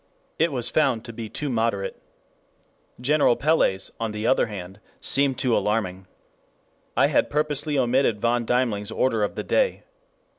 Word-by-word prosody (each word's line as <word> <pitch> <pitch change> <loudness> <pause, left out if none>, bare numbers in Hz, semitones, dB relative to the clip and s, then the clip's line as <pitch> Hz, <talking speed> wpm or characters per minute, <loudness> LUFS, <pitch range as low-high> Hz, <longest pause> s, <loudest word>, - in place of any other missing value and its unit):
It 165 +1 +3
was 125 -4 -1
found 130 -7 +1
to 115 - -8
be 115 -1 -6
too 150 - -4
moderate. 110 -6 -1 1.0
General 140 -1 +3
Pellé's, 140 -11 +1
on 115 -2 -2
the 105 +1 -4
other 130 - +3
hand, 95 -2 -8 0.2
seemed 135 -2 +2
too 125 -3 +1
alarming. 95 -3 -1 0.9
I - - +5
had - - +2
purposely 150 0 -1
omitted 125 -3 +2
von 120 +2 +1
Deimling's 115 -4 0
order 115 -4 0
of 105 - -2
the - - -3
day. - - +1
120 Hz, 150 wpm, -24 LUFS, 105-140 Hz, 1.0 s, I